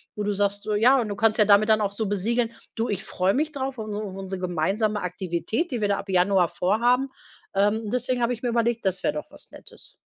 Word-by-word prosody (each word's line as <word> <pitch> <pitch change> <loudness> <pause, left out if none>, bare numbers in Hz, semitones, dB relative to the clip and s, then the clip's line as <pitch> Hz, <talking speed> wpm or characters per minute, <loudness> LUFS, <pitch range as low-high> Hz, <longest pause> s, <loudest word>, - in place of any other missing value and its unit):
Wo 210 - -3
du 205 - 0
sagst, 200 +1 -1
so, 215 - -2
ja 245 +6 +5
und 225 - -1
du 205 - -4
kannst 225 -1 +2
ja 215 - +5
damit 205 +1 +5
dann 215 0 +4
auch 200 - 0
so 215 0 -2
besiegeln: 225 +4 0 0.2
„Du, 225 +1 -2
ich 195 -2 -2
freue 185 +4 0
mich 310 +2 0
drauf 270 -2 -4
auf 220 - -5
auf - - -6
unsere 210 +1 -3
auf 190 - -8
unsere 190 -1 -6
gemeinsame 195 +5 0
Aktivität, 180 - -2
die 245 - -2
wir 205 - +2
da 200 - +1
ab 200 - -9
Januar 180 0 +4
vorhaben. 240 +10 +1 0.5
Ähm, 210 +2 +1
deswegen 250 0 0
habe 235 +1 +1
ich 235 - -8
mir 250 - -2
überlegt, 235 -1 0
das 190 -1 0
wäre - - +1
doch 150 - -6
was - - -14
Nettes.“ - - -13
210 Hz, 255 wpm, -25 LUFS, 195-235 Hz, 0.5 s, ja